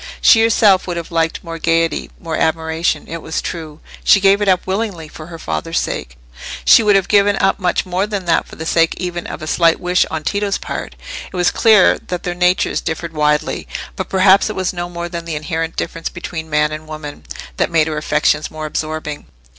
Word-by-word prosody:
She 225 Hz, -, +6 dB
herself 210 Hz, -4 st, +4 dB
would 175 Hz, -1 st, -3 dB
have 170 Hz, 0 st, -6 dB
liked 165 Hz, -1 st, 0 dB
more 165 Hz, -1 st, -7 dB
gaiety, 165 Hz, 0 st, 0 dB
more 165 Hz, -2 st, -4 dB
admiration: 160 Hz, +1 st, 0 dB
it 165 Hz, 0 st, -6 dB
was 160 Hz, -, -3 dB
true, 155 Hz, -2 st, -6 dB, 0.2 s
she 200 Hz, -, +6 dB
gave 195 Hz, +1 st, +4 dB
it 205 Hz, -, 0 dB
up 185 Hz, -1 st, +2 dB
willingly 190 Hz, -4 st, -3 dB
for 155 Hz, 0 st, -11 dB
her 170 Hz, -1 st, -9 dB
father's 80 Hz, -, -3 dB
sake—she -, -, 0 dB
would 210 Hz, -2 st, +4 dB
have 195 Hz, -1 st, +2 dB
given 205 Hz, -1 st, +4 dB
up 195 Hz, +2 st, +2 dB
much 180 Hz, 0 st, 0 dB
more 185 Hz, +2 st, -1 dB
than 200 Hz, -3 st, -4 dB
that 165 Hz, -1 st, +1 dB
for -, -, -12 dB
the 160 Hz, -, -7 dB
sake 165 Hz, 0 st, +2 dB
even 175 Hz, -1 st, -4 dB
of -, -, -7 dB
a -, -, -4 dB
slight 165 Hz, +1 st, +3 dB
wish 180 Hz, +1 st, +2 dB
on 160 Hz, -1 st, -4 dB
Tito's 200 Hz, +3 st, -1 dB
part. -, -, -6 dB, 0.4 s
It -, -, -10 dB
was 175 Hz, 0 st, +3 dB
clear 215 Hz, -5 st, +5 dB
that 180 Hz, -1 st, -6 dB
their 175 Hz, -, -2 dB
natures 180 Hz, +1 st, +1 dB
differed 165 Hz, +1 st, -4 dB
widely; 150 Hz, -1 st, 0 dB, 0.3 s
but -, -, -5 dB
perhaps 190 Hz, +2 st, +4 dB
it 215 Hz, -, -4 dB
was 185 Hz, -1 st, -1 dB
no 175 Hz, -1 st, -4 dB
more 170 Hz, 0 st, -5 dB
than 170 Hz, -1 st, -6 dB
the 165 Hz, -2 st, -4 dB
inherent 160 Hz, +1 st, -3 dB
difference 165 Hz, -, -4 dB
between 165 Hz, -2 st, -7 dB
man 150 Hz, 0 st, +2 dB
and 155 Hz, 0 st, -7 dB
woman, 155 Hz, -1 st, -8 dB, 0.3 s
that -, -, +1 dB
made 160 Hz, -2 st, +3 dB
her 155 Hz, -1 st, -3 dB
affections 150 Hz, 0 st, +1 dB
more 155 Hz, 0 st, -6 dB
absorbing. 155 Hz, -1 st, -4 dB
170 Hz, 210 wpm, -17 LUFS, 155-185 Hz, 0.4 s, She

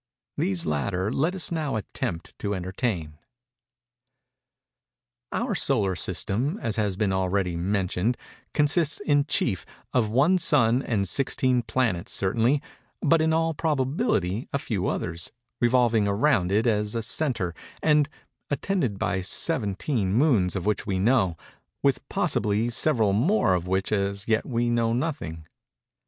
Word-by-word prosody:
These 90 Hz, -3 st, -1 dB
latter 90 Hz, -, -1 dB
let 165 Hz, +7 st, 0 dB
us 180 Hz, -, 0 dB
now 155 Hz, -6 st, -1 dB
attempt 85 Hz, -5 st, -4 dB
to 100 Hz, 0 st, -2 dB
entertain. 90 Hz, -4 st, -3 dB, 2.1 s
Our 235 Hz, -1 st, -1 dB
solar 110 Hz, -, +1 dB
system, 100 Hz, -, -1 dB
as 115 Hz, -4 st, -2 dB
has 105 Hz, -4 st, 0 dB
been 100 Hz, -3 st, +1 dB
already 95 Hz, -1 st, 0 dB
mentioned, 95 Hz, +5 st, 0 dB, 0.3 s
consists, 150 Hz, +1 st, +3 dB
in 145 Hz, -6 st, +2 dB
chief, 100 Hz, -, 0 dB, 0.3 s
of 115 Hz, -4 st, +2 dB
one 150 Hz, +11 st, +3 dB
sun 125 Hz, -6 st, +3 dB
and 105 Hz, -7 st, -1 dB
sixteen 130 Hz, -, +1 dB
planets 115 Hz, -7 st, -1 dB
certainly, 115 Hz, +8 st, +2 dB, 0.4 s
but 160 Hz, +2 st, +4 dB
in 160 Hz, 0 st, +2 dB
all 165 Hz, 0 st, +1 dB
probability 140 Hz, -, 0 dB
a -, -, +1 dB
few 105 Hz, -8 st, -2 dB
others, 85 Hz, -1 st, -3 dB, 0.3 s
revolving 120 Hz, -3 st, +3 dB
around 100 Hz, -3 st, +2 dB
it 110 Hz, +3 st, +2 dB
as 105 Hz, -1 st, +1 dB
a 115 Hz, -, -1 dB
centre, 110 Hz, -, 0 dB, 0.3 s
and 150 Hz, -1 st, +3 dB, 0.4 s
attended 145 Hz, -, -1 dB
by 95 Hz, 0 st, -1 dB
seventeen 105 Hz, -, 0 dB
moons 115 Hz, -, +3 dB
of 95 Hz, -, -3 dB
which 105 Hz, -1 st, -1 dB
we 95 Hz, -3 st, 0 dB
know, 95 Hz, -4 st, +2 dB, 0.5 s
with -, -, +1 dB
possibly 105 Hz, +3 st, 0 dB
several 115 Hz, -6 st, +2 dB
more 130 Hz, -, +3 dB
of 90 Hz, -1 st, -1 dB
which 95 Hz, +1 st, -1 dB
as 100 Hz, -1 st, -1 dB
yet 110 Hz, 0 st, +1 dB
we 120 Hz, -2 st, 0 dB
know 115 Hz, -1 st, +1 dB
nothing. 120 Hz, -, -3 dB
110 Hz, 135 wpm, -25 LUFS, 95-140 Hz, 2.1 s, but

